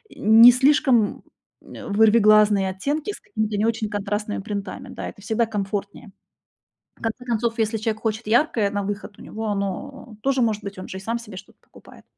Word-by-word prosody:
не 225 +3 +8
слишком, 255 -4 +2 0.4
э, - - -11
вырвиглазные 210 -2 +4
оттенки 290 - -3
с - - -10
какими-то 215 -2 -3
не 210 - +1
очень 225 -1 -1
контрастными 205 +1 -3
принтами. 205 +5 -6
Да, - - -6
это - - -14
всегда 220 +3 0
комфортнее. 205 0 -5 0.9
В - - -23
конце 225 +2 -4
концов, 235 -1 -1
если 220 0 0
человек 220 0 -3
хочет 220 0 -2
яркое 235 -3 +2
на 205 0 -2
выход, 205 +1 -5
у - - -12
него 220 +1 -7
оно 210 +4 -5
тоже 270 -1 +1
может 215 -3 0
быть, 200 -1 -7
он 185 - -8
же 190 - -6
сам 230 +4 -3
себе 210 -5 -11
что-то - - -13
покупает. - - -18
215 Hz, 175 wpm, -23 LUFS, 205-235 Hz, 0.9 s, не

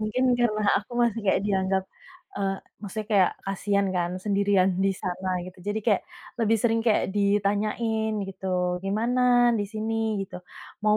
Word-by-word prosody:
mungkin 215 +4 -1 0.2
karena 215 -3 +1 0.2
aku 205 - -21
masih 235 -2 +2
kayak 195 - +3
dianggap, 190 -1 +1 0.5
eee, 195 -1 -1 0.2
maksudnya 210 +1 -5
kayak 190 -3 +5
kasian 200 +1 0
kan, 175 0 0
sendirian 200 -2 +3 0.2
di - - +4
sana 185 0 -4 0.2
gitu, 185 +1 -11
jadi 210 +1 0
kayak, 210 -5 +2 0.4
lebih 225 0 +3
sering 225 +1 +1
kayak 225 -2 +2
ditanyain 210 +2 +1
gitu, 180 -2 -2
"Gimana 230 +6 0 0.4
di - - 0
sini?" 220 0 -1
gitu. 180 - -10 0.4
"Mau 210 0 +4
205 Hz, 150 wpm, -26 LUFS, 195-220 Hz, 0.5 s, kayak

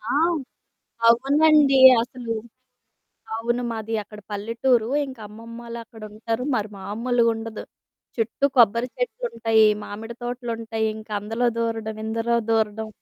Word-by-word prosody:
ఆ! 225 - -4 1.0
అవునండి 280 +3 +5 0.2
అసలు. 240 -2 -5 1.0
అవును, 235 +2 -1
మాది 225 0 -5
అక్కడ 210 0 -12
పల్లెటూరు 230 +3 +1 0.2
ఇంకా 260 -4 -10
అమ్మమ్మాలు 230 +2 -9
అక్కడుంటారు. 225 +1 -5
మరి 215 -1 -2
మామూలుగుండదు. 225 +2 -1 0.5
చుట్టూ 230 +4 +1
కొబ్బరి 235 +1 +4
చెట్లుంటయి, 230 - +1 0.2
మామిడి 225 +3 -7
తోటలుంటయి 230 -2 -3
ఇంక 220 0 -11
అందులో 225 +4 -1
దూరడం, 225 -1 -2
ఇందులో 225 +1 0
దూరడం 220 -1 0
230 Hz, 100 wpm, -23 LUFS, 220-240 Hz, 1.0 s, అవునండి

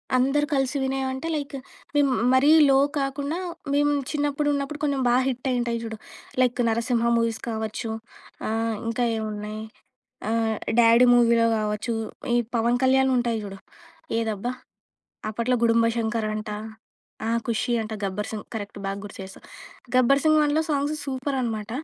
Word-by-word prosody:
అందరూ 275 +3 +2
కలిసి 270 0 +1
వినేవంటే 265 +2 -2
లైకు, 285 -2 -4 0.4
మేము 285 -2 +4 0.2
మరీ 265 +3 +5 0.2
లో 270 - +5 0.2
కాకుండా, 280 +4 -2 0.4
మేము 290 0 +3 0.2
చిన్నప్పుడు 290 0 0
ఉన్నప్పుడు 285 +1 -3
కొంచెం 280 -2 +1
బా 240 - +4
హిట్ 255 0 -2
అయ్యి 250 - +1
ఉంటాయి 235 -1 -1
చూడు. 220 -1 -5 0.4
లైక్, 250 0 +2
'నరసింహ' 235 +1 +1
మూవీస్ 230 -1 0
కావచ్చు. 220 0 -3 0.6
ఆహ్, 225 0 0
ఇంకా 230 +2 0
ఏమున్నాయి? 215 0 -4 0.7
ఆహ్, 225 -1 +1 0.2
'డాడీ' 235 +1 +7
మూవీలో 235 -1 +4
కావచ్చు. 215 +2 -2 0.4
ఈ - - +4 0.2
పవన్ 235 +2 +2
కళ్యాణ్‌వి 265 0 +4
ఉంటాయి 235 -2 0
చూడు. 195 -1 -8 0.6
ఏదబ్బా! 225 +1 -2 0.8
అప్పట్లో 235 +3 0
'గుడుంబా 230 0 +4
శంకర్' 225 -1 -1
అంట. 215 0 -4 0.8
ఆహ్, 230 0 +1
'ఖుషి' 240 +1 0
అంట, 220 0 -6
'గబ్బర్ 200 +2 -3
సింగ్' 215 -1 -6
కరెక్ట్ 205 -1 -6
బాగా 195 +1 -3
గుర్తు 205 - -9
చేసావ్. 190 0 -11 0.5
'గబ్బర్ 255 +2 +5
సింగ్ 310 0 +5
1' 295 +2 +2
సాంగ్సు 290 +1 0
సూపర్ 270 +1 -2
అనమాట. 220 -3 -3
240 Hz, 145 wpm, -25 LUFS, 220-270 Hz, 0.8 s, డాడీ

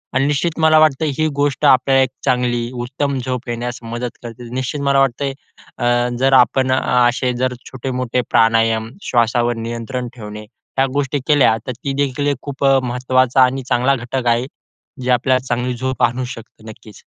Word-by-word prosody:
आणि 135 +1 +2
निश्चित 155 +3 -1
मला 155 -1 +5
वाटतं 155 0 +3
ही 155 - +2
गोष्ट 145 0 0
आपल्याला 135 0 +5
एक 130 - -1 0.2
चांगली, 120 -1 0
उत्तम 135 +2 -2
झोप 130 -1 -4
येण्यास 120 +1 -4
मदत 120 +1 -5
करते. 120 0 -9
निश्चित 130 +3 -3
मला 140 -1 +2
वाटतयं 135 +1 0 0.4
अ, 120 0 +1
जर 135 +1 +3
आपण 130 +1 +4
असे 125 0 +2
जर 130 0 0 0.2
छोटे-मोठे 125 -1 -2
प्राणायाम, 115 0 +2
श्वासावर 120 0 +1
नियंत्रण 115 +2 -4
ठेवणे 105 -2 -8 0.3
ह्या 135 - +4
गोष्टी 145 0 -1
केल्या 145 -7 +4
तर - - -1
ती 135 +3 -5
देखील 140 +1 -2
एक 140 -3 0
खूप 140 -1 -6
अ, 135 -1 +5
महत्त्वाचा 130 +1 +2
आणि 130 +1 0
चांगला 125 +2 +2
घटक 125 0 -4
आहे. 120 +1 +2 0.6
जे 125 - -3
आपल्याला 130 +1 +2
चांगली 125 0 -1
झोप 130 +1 -2
आणू 120 +2 +1
शकतो. 115 -2 -11
नक्कीच. 110 -1 -14
125 Hz, 170 wpm, -18 LUFS, 120-135 Hz, 0.6 s, मला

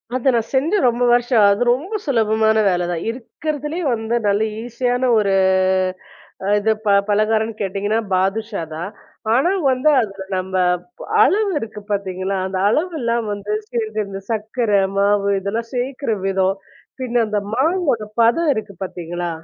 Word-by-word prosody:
அது 260 +1 +2
நான் 230 -1 -1
செஞ்சு 305 +10 +2
ரொம்ப 240 +1 -1
வருஷம் 240 0 +3
ஆவுது. 200 -1 +6
அது 215 - 0
ரொம்ப 355 - -6
சுலபமான 220 -4 +2
வேலதான். 175 -2 -1
இருக்கிறதுலயே 295 +7 -4
வந்து, 225 0 -2
நல்ல 200 +1 +2 0.2
ஈஸியான 245 +1 0
ஒரு 200 -2 +1 1.1
அ - - -3
இது 220 +2 +2
ப 210 - +2 0.2
பலகாரம்னு 215 +2 +1
கேட்டீங்கன்னா 205 +2 -1 0.2
பாதுஷா 200 +1 -1
தான். 175 +5 -5 0.4
ஆனா, 270 +9 +3 0.2
வந்து 260 +3 +2
அதுல 195 -4 -4
நம்ம 185 +1 -4 0.7
அளவு 425 0 +3
இருக்கு 215 -1 -7
பார்த்தீங்களா? 190 -1 -2
அந்த 190 0 -3
அளவெல்லாம் 235 - 0
வந்து 205 +1 -4 0.2
சேர்ந்து 220 -3 -2
இந்த 195 0 -6
சர்க்கர, 225 +1 -2 0.3
மாவு, 200 0 +2
இதெல்லாம் 225 +4 -3
சேர்க்கிற 255 -1 -2
விதம். 195 0 +1 0.4
பின்ன 245 -2 +1
அந்த 210 -1 -1 0.2
மாவோட 300 - +1 0.2
பதம் 290 +8 +3
இருக்கு 205 -2 -5
பார்த்தீங்களா? 175 -1 -5
220 Hz, 140 wpm, -20 LUFS, 200-250 Hz, 1.1 s, ஆவுது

